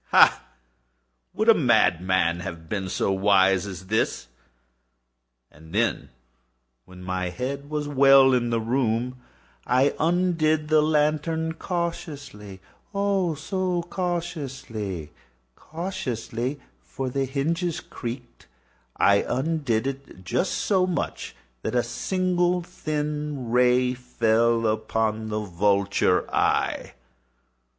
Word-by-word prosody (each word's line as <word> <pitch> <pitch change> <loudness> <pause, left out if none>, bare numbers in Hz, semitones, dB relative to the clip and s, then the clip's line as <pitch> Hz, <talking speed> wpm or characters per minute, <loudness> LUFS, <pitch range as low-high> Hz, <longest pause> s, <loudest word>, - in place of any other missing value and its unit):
Ha!—would 60 0 0
a - - +9
madman 85 0 +2
have 85 -2 -7
been 95 +1 -3
so 100 - 0
wise 95 -1 +3
as 95 -1 -8
this? 105 - -1 1.2
And 80 +2 -13
then, 70 - 0 0.8
when 90 0 -13
my 90 0 -2
head 140 +9 -5
was 150 -1 -2
well 135 -1 +6
in 120 -1 +1
the 115 -1 +1
room, 125 +1 -1 0.5
I 130 +3 +3
undid 160 -3 +1
the 155 -1 +5
lantern 155 +1 +1
cautiously—oh, 170 - -4
so 180 +3 -2
cautiously—cautiously 130 - -5 0.2
(for 135 -1 -5
the 135 +1 0
hinges 160 +6 -1
creaked)—I 115 - -3
undid 135 -5 0
it 135 -8 -6
just 175 - -1
so 185 -3 +1
much 180 - -3 0.3
that - - -3
a 120 - +3
single 180 +6 0
thin 150 -5 -4
ray 125 +1 +3
fell 115 -2 +1
upon 110 0 -1
the 110 0 -2
vulture 100 0 +1
eye. - - 0
125 Hz, 95 wpm, -25 LUFS, 100-155 Hz, 1.2 s, a